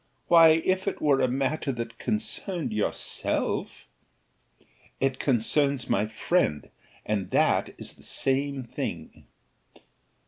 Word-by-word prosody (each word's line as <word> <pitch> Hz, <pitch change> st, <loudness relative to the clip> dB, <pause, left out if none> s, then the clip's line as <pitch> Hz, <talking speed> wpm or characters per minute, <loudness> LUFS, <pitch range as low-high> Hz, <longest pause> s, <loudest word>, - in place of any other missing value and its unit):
why, 165 Hz, -2 st, +8 dB
if 185 Hz, +1 st, 0 dB
it 200 Hz, -, -2 dB
were 140 Hz, -3 st, +3 dB
a -, -, +3 dB
matter 135 Hz, +3 st, -1 dB
that 115 Hz, -2 st, -6 dB
concerned 195 Hz, -, -2 dB
yourself 105 Hz, -1 st, -2 dB, 0.6 s
" -, -, -36 dB, 0.3 s
"It 135 Hz, -1 st, 0 dB
concerns 140 Hz, +2 st, +1 dB
my 105 Hz, +2 st, +2 dB
friend, 110 Hz, -, 0 dB, 0.3 s
and 105 Hz, -3 st, -2 dB
that -, -, +2 dB
is -, -, -5 dB
the -, -, -19 dB
same 135 Hz, 0 st, 0 dB
thing." 120 Hz, -, -6 dB
135 Hz, 115 wpm, -27 LUFS, 115-160 Hz, 0.6 s, why